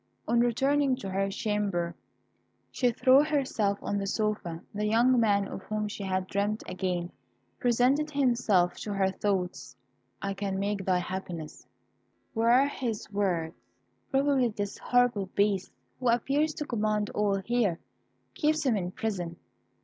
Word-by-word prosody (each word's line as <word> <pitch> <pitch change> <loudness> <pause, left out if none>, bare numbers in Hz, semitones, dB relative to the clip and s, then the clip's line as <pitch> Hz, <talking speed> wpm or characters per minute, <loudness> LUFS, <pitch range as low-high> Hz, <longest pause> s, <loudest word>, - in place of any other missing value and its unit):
On 235 - +3
returning 270 +3 +2
to 195 -7 -6
her 195 +1 0
chamber, 200 -4 -1 0.8
she 250 - +2
threw 260 +4 +5
herself 260 -9 0
on 205 - -1
the 195 - -3
sofa; 205 -6 -2
the 210 +1 -1
young 240 +3 +4
man 200 -3 +3
of - - -7
whom 215 0 -2
she 205 - -6
had 185 -1 -1
dreamt 200 +3 -1
again 180 -2 -2 0.5
presented 250 +5 +2
himself 235 -11 +2
to 210 - -4
her 190 -1 +2
thoughts. 190 -2 -2 0.5
"'I 195 0 -1
can 195 -1 -3
make 200 -1 -2
thy 185 -1 +3
happiness,' 180 -3 -6 0.7
were 235 +4 +4
his 240 -8 -4
words. 180 -5 0 0.6
Probably 270 -2 +3
this 205 -2 -4
horrible 245 -6 +2
Beast, 200 -2 +1 0.3
who 250 -2 +1
appears 280 +6 +1
to 300 - -4
command 215 -4 0
all 205 -1 +1
here, 205 -3 0 0.6
keeps 305 0 +1
him 250 -4 +3
in 180 -3 -2
prison. 185 -6 -3
210 Hz, 140 wpm, -29 LUFS, 195-245 Hz, 0.8 s, threw